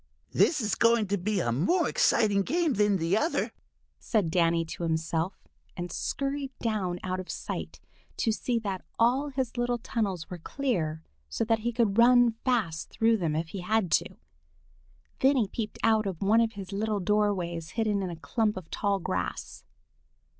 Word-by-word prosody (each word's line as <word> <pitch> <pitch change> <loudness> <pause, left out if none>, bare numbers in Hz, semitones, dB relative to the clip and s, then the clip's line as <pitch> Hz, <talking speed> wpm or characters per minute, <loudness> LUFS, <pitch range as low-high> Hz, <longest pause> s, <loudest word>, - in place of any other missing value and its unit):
"This 310 -5 +3
is 210 -3 -1
going 230 0 +4
to 200 - +1
be 205 +2 0
a 120 - 0
more 290 - +2
exciting 205 -3 +3
game 330 - +1
than 205 -2 +3
the 165 +2 +1
other," 310 +10 0 0.5
said 205 -9 0
Danny 170 -1 +2
to 165 - -8
himself, 165 +2 -2 0.3
and 175 0 -4
scurried 275 +5 -2
down 195 -6 -2
out 185 0 -2
of 185 - -7
sight - - -5 0.4
to 225 - +1
see 235 +2 -1
that 200 -5 -3
all 255 +5 +2
his 260 -3 -3
little 240 0 0
tunnels 200 -7 -2
were 180 - -7
clear 165 - -2 0.3
so - - -1
that 225 0 +2
he 235 +2 -1
could 225 -3 +1
run 245 0 +6
fast 215 -11 0
through 225 0 +2
them 165 -6 -1
if 160 +1 -2
he 195 - -6
had 205 -1 0
to. - - +1 1.0
Then 270 +2 +4
he 225 -5 +2
peeped 215 +2 -5
out 220 -2 +3
of 185 -4 -4
one 220 +4 +4
of 225 0 0
his 195 -2 -8
little 210 +1 -1
doorways 180 -5 0
hidden 215 -3 +1
in 185 - -2
a 170 - -5
clump 210 +5 -1
of 180 -3 -9
tall 200 -1 0
grass. 90 - -4
210 Hz, 175 wpm, -28 LUFS, 180-230 Hz, 1.0 s, run